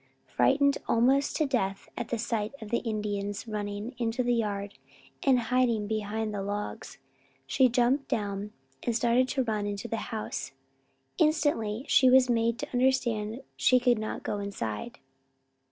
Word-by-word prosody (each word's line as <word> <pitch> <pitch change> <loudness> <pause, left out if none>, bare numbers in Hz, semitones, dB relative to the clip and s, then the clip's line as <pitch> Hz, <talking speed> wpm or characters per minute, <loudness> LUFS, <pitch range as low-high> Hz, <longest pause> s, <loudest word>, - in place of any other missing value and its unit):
Frightened 280 0 +3
almost 265 +4 +3
to 310 - +2
death 195 -8 -1
at - - -4
the 235 - -2
sight 220 0 -2
of 215 -2 -9
the 235 - +2
Indians 210 -2 -3
running 210 +2 -4
into 235 +1 0
the 245 0 +2
yard 205 -3 -2 0.4
and 265 -3 +4
hiding 235 -2 +1
behind 215 0 -2
the 200 - -3
logs, 205 +1 -5 0.5
she 260 -2 +3
jumped 250 +3 +2
down 205 -1 -2 0.3
and 235 - -1
started 240 +2 +3
to 265 0 0
run 215 -3 -1
into 200 -1 -4
the 230 - -2
house. 220 - -4 0.7
Instantly 290 -7 +1
she 260 - +6
was 255 -1 +6
made 230 0 +1
to 290 +1 -6
understand 245 -3 +1
she 255 - +4
could 245 -2 +3
not 215 - -4
go 205 - -2
inside. 200 - -4
230 Hz, 155 wpm, -28 LUFS, 210-250 Hz, 0.7 s, she